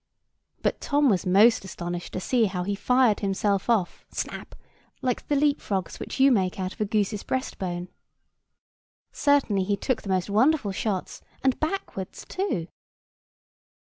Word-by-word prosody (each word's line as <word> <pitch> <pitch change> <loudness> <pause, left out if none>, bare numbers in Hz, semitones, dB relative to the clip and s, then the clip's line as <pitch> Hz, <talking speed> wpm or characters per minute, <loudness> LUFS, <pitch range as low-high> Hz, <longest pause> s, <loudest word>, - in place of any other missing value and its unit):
But - - 0
Tom 290 -1 +3
was 190 -1 0
most 210 +5 +5
astonished 175 -2 -5
to - - -2
see 235 +4 +2
how 185 -3 -2
he 200 +3 -1
fired 250 +1 +3
himself 200 +1 0
off—snap! 210 -7 -2 0.5
like 250 -2 -1
the 290 - +1
leap 285 0 +2
frogs 190 -4 -3
which - - -6
you 270 +1 +6
make 190 -5 +1
out 185 0 -2
of - - -9
a - - +2
goose's 210 0 0
breast 260 0 -3
bone. 175 -1 -3 1.2
Certainly 270 -10 +2
he 200 +1 0
took 250 +4 -1
the 200 - -8
most 185 -2 +1
wonderful 220 +2 +3
shots, 190 -1 -3 0.2
and 265 -2 +2
backwards, 310 - -4
too. 365 - -2
205 Hz, 150 wpm, -26 LUFS, 190-260 Hz, 1.2 s, you